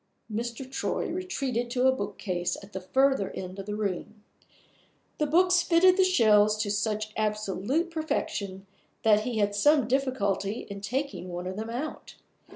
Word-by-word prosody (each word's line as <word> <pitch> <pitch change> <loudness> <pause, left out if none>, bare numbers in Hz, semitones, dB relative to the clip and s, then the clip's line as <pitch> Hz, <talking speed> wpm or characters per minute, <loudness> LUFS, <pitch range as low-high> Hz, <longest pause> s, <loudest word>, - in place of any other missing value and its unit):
Mr. 235 +3 -4
Troy 265 - -2
retreated 275 -10 -2
to 250 +1 +1
a 260 - +7
bookcase 180 -8 -3
at 200 +1 -14
the 190 - -4
further 265 +1 +2
end 185 +1 -6
of 195 - -7
the 210 - -3
room. 210 +1 -4 1.0
The 300 - +2
books 360 +3 +4
fitted 360 +2 +5
the 380 - +4
shelves 215 - +4
to 205 - -2
such 215 0 -1
absolute 215 - -1
perfection 200 - -3 0.4
that 215 -1 +5
he 245 -3 -2
had 205 -1 +1
some 275 +4 +4
difficulty 230 -6 0
in 200 0 -6
taking 255 -2 -3
one 175 0 -5
of 185 +1 -4
them 220 +2 -5
out. 260 +7 -5
220 Hz, 160 wpm, -28 LUFS, 200-275 Hz, 1.0 s, a